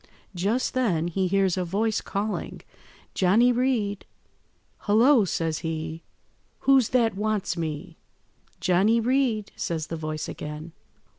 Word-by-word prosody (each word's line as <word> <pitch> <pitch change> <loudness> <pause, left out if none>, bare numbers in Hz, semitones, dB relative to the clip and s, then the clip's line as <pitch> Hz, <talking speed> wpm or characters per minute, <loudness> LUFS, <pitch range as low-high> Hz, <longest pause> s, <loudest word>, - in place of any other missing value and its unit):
Just 205 +8 0
then 180 -11 +1
he 185 +2 0
hears 195 -1 +1
a 185 - 0
voice 210 +5 0
calling— 205 +2 -4 0.5
"'Johnny 215 +7 +4
Reed!' 235 -5 0 0.8
"'Hullo!' 225 +2 +5
says 165 -2 -1
he, 160 0 -4 0.6
'who's 270 -4 +4
that 235 -3 +2
wants 210 -2 -1
me?' 165 +1 -5 0.6
"'Johnny 195 +6 +3
Reed,' 235 -3 0
says 160 -2 -3
the - - -2
voice 155 -1 -4
again. 150 +2 -7
195 Hz, 120 wpm, -25 LUFS, 165-225 Hz, 0.8 s, Hullo